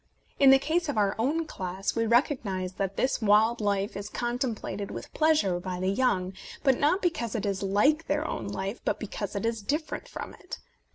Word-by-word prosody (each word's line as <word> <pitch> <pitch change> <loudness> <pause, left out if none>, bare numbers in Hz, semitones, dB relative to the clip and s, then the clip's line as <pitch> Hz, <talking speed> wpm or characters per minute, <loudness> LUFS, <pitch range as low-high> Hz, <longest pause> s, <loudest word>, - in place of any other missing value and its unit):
In 275 - +7
the 270 - +9
case 320 +4 0
of 275 - -2
our 200 -2 +3
own 305 +8 +1
class, 190 -7 -3
we 230 0 +1
recognize 215 -7 +1
that 195 +1 -3
this 260 - +1
wild 220 +2 +4
life 200 -1 0
is 200 +1 -5
contemplated 240 -4 -3
with - - -8
pleasure 305 - +2
by 180 0 -4
the 185 +1 +1
young, 195 -5 +1 0.3
not 290 +8 +3
because 305 -11 -1
it 220 - -1
is 195 -1 -1
like 210 +12 +2
their 300 +2 0
own 110 - -4
life, 195 - -4
but - - -1
because 205 -2 -5
it 200 - -2
is 230 -1 -1
dif 300 +10 -1
ferent - - -6
from - - -7
it. - - -8
220 Hz, 195 wpm, -28 LUFS, 195-280 Hz, 0.3 s, the